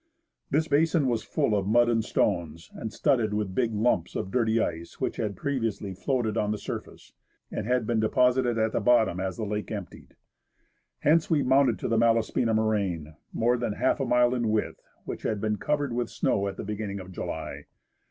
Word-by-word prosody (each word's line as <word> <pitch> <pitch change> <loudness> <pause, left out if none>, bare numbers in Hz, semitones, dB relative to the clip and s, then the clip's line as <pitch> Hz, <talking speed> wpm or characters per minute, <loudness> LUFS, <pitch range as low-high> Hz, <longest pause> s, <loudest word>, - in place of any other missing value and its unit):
This 155 +3 +1
basin 160 +1 +3
was 115 -3 0
full 105 - 0
of 100 -1 -1
mud 120 +3 +4
and 115 -1 +2
stones, 85 -6 -1
and 110 - -6
studded 110 -5 +1
with 105 -3 -2
big 120 +2 +1
lumps 105 -5 0
of 95 - -3
dirty 115 -1 +2
ice, 85 -4 -3
which - - -2
had 105 -3 -2
previously 115 -5 -2
floated 115 +2 -1
on 105 - +1
the 105 - -1
surface, - - -8 0.4
and 105 - -4
had 125 -2 +1
been 115 0 +1
deposited 125 +2 +2
at 110 0 +1
the - - 0
bottom 110 -5 +3
as 95 -1 -3
the 110 - -3
lake 105 0 -3
emptied. 100 -4 -8 0.9
Hence 160 +2 +3
we 150 -4 +3
mounted 130 -3 +3
to - - -3
the 115 -1 +2
Malaspina 115 0 +2
moraine, 100 -8 0 0.2
more 120 +2 +2
than 120 -3 -2
half 130 +6 +1
a 135 - 0
mile 125 0 +3
in 120 -3 0
width, 110 0 -1 0.2
which - - -5
had 110 - -1
been 105 0 -1
covered 145 -2 -1
with 120 0 -1
snow 100 0 0
at 100 - -5
the - - -5
beginning 105 -1 -4
of 95 0 -9
July. 85 -3 -5
110 Hz, 195 wpm, -27 LUFS, 100-125 Hz, 0.9 s, mud